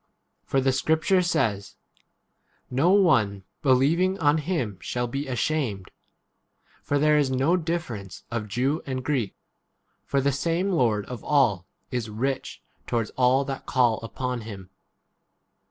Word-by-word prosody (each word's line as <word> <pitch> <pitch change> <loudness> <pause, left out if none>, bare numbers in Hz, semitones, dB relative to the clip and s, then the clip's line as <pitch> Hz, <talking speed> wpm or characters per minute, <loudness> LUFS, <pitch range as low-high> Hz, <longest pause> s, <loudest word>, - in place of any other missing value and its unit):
For 135 - +1
the 135 0 +2
scrip 155 +5 +1
ture 190 -1 +4
says, 110 - -1 1.0
No 135 +7 +3
one 120 - +3 0.2
believing 150 +7 +3
on 150 -2 +3
12 - - 0
him 125 - -1
shall 120 +6 -2
be 140 +4 -4
ashamed. 125 -7 -2 0.9
For 145 - 0
there 150 +1 +4
is 140 -3 +2
no 135 +7 +2
difference 160 - -4
of 115 -2 -3
Jew 130 +8 0
and 130 -1 -3
Greek; 130 -9 -1 0.7
for 140 - +1
the 140 +1 +2
same 170 +7 0
Lord 115 - +1
of 125 -2 -8
all 115 - +2 0.2
[is] 120 -3 -2
rich 130 +5 -3 0.2
towards 115 -3 -1
all 130 +2 +3
that 135 -1 -6
call 120 -4 +2
upon 125 +2 -4
him. 100 -4 -9
130 Hz, 140 wpm, -25 LUFS, 115-150 Hz, 1.0 s, ture